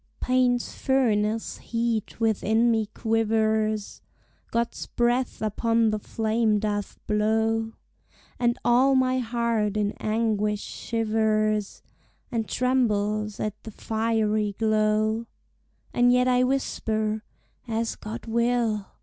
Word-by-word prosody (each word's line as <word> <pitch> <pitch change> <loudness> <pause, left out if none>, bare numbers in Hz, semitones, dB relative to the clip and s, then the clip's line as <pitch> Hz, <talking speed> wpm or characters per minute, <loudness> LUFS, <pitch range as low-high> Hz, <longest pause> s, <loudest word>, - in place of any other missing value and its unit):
Pain's 250 -1 +1
furnace 225 -5 0
heat 230 -2 -2
within 225 +1 +2
me 220 -2 +1
quivers, 220 -1 0 0.5
God's 235 0 -2
breath 240 0 0
upon 225 +1 +1
the 215 - -1
flame 220 0 0
doth 205 -1 -2
blow, 220 +1 +1 0.7
And 240 0 +2
all 260 +3 +4
my 260 0 +2
heart 230 -3 0
in 205 -1 +1
anguish 215 -1 0
shivers, 215 -2 -1 0.5
And 225 -2 -2
trembles 215 -5 0
at 215 -1 -3
the - - -7
fiery 215 -1 0
glow: 215 +1 +1 0.7
And 245 0 +4
yet 250 0 +3
I 250 0 +3
whisper, 220 -5 -1 0.4
As 225 0 -1
God 215 +2 -7
will! 235 -3 0
225 Hz, 105 wpm, -25 LUFS, 215-235 Hz, 0.7 s, all